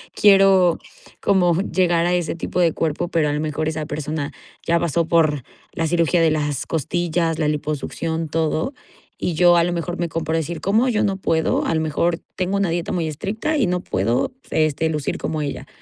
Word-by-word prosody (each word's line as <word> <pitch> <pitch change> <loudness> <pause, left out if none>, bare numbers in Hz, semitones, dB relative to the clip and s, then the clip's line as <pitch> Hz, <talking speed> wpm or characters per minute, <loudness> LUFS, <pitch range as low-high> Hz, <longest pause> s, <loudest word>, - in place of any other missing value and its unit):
quiero 195 -4 +5 0.4
como 180 -3 +3
llegar 175 -3 +1
a 175 - +1
ese 175 -3 -1
tipo 170 +2 -3
de 165 -3 +3
cuerpo, 165 +2 -1
pero 160 -3 +1
a - - -1
lo 150 - -1
mejor 155 0 -2
esa 155 -1 -3
persona 150 0 -4 0.3
ya 170 0 +2
pasó 170 0 0
por 155 -5 +2 0.3
la 165 - -1
cirugía 170 +1 +2
de 165 -1 +4
las 150 -2 -1
costillas, 165 +1 -1
la 155 - +1
liposucción, 155 +2 -3
todo 160 - -1 0.4
y 175 - -2
yo 175 +1 +6
a 170 - +4
lo 175 - 0
mejor 175 +1 -3
me 170 -1 -1
comparo 160 0 -1
a - - +2
decir: 160 +1 -4
"¿Cómo 220 +8 +2
yo 220 -3 +1
no 195 -1 +1
puedo?". 165 -4 +1
A 165 - +1
lo - - +2
mejor 160 +2 0 0.2
tengo 185 +1 -1
una 200 -3 +1
dieta 170 0 -2
muy 170 -3 -1
estricta 205 - -2
y 265 -9 +2
no 180 0 0
puedo, 115 - 0 0.2
este, 155 0 +1
lucir 150 -3 -2
como 155 -1 -2
ella; 140 - -5
165 Hz, 200 wpm, -21 LUFS, 155-175 Hz, 0.4 s, yo